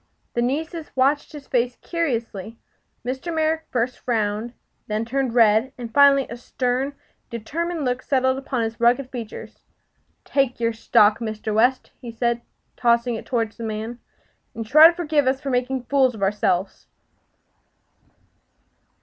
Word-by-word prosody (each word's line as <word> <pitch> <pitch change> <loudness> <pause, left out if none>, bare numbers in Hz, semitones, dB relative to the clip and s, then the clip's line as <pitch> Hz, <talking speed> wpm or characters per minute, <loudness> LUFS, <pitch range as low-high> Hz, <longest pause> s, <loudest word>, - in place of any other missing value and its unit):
The 240 - 0
nieces 315 +6 -2
watched 275 +3 +2
his 295 -2 -10
face 245 -1 0
curiously. 230 - -3 0.5
Mr. 265 +7 -3
Merrick 320 0 0
first 245 0 -1
frowned, 225 0 -2 0.3
then 215 +1 -1
turned 260 0 -1
red, 225 +2 +4
and 235 -2 -7
finally 280 0 +6
a 235 - -7
stern, 255 +3 -2 0.3
determined 315 +8 -3
look 250 0 -1
settled 260 -1 +1
upon 265 -3 -2
his 225 0 -4
rugged 245 +3 +2
features. 235 -4 -8 0.7
"Take 270 -4 0
your 230 0 +1
stock, 210 -1 +3
Mr. 220 -1 -4
West," 245 +4 +2
he 240 - -7
said, 235 +1 -1 0.3
tossing 235 0 +2
it 225 - -6
toward 230 -4 0
the 230 - -10
man; 220 +2 -4 0.6
"and 225 - -4
try 305 +8 +9
to 340 - +1
forgive 305 -5 +1
us 265 +1 +2
for 275 -1 -4
making 250 +1 -1
fools 260 -1 +2
of 200 - -5
ourselves!" 195 -2 0
245 Hz, 145 wpm, -23 LUFS, 230-275 Hz, 0.7 s, try